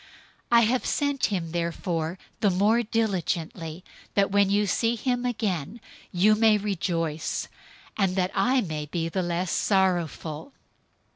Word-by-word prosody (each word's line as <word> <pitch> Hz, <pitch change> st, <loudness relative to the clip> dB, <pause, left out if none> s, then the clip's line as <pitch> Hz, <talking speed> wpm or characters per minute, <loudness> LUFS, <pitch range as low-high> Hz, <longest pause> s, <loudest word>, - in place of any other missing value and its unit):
002:028 235 Hz, -, +7 dB
I -, -, +8 dB
have 240 Hz, +3 st, +1 dB
sent 285 Hz, -2 st, +1 dB
him 175 Hz, -5 st, -3 dB
therefore 170 Hz, 0 st, -2 dB, 0.2 s
the 205 Hz, -, +3 dB
more 205 Hz, +6 st, +3 dB
diligently, 180 Hz, -, -2 dB, 0.3 s
that, 195 Hz, -1 st, +3 dB
when 200 Hz, -1 st, +4 dB
you 205 Hz, +1 st, +2 dB
see 230 Hz, +5 st, +1 dB
him 245 Hz, +1 st, -1 dB
again, 205 Hz, -, -2 dB, 0.3 s
you 200 Hz, +4 st, +4 dB
may 215 Hz, 0 st, +4 dB
rejoice, 170 Hz, -6 st, -2 dB, 0.5 s
and 195 Hz, -3 st, +1 dB
that 185 Hz, -1 st, 0 dB
I 250 Hz, +7 st, +2 dB
may 155 Hz, -6 st, -4 dB
be 165 Hz, +1 st, -2 dB
the 185 Hz, +3 st, -1 dB
less 175 Hz, 0 st, -1 dB
sorrowful. 175 Hz, -, 0 dB
190 Hz, 140 wpm, -26 LUFS, 170-220 Hz, 0.5 s, I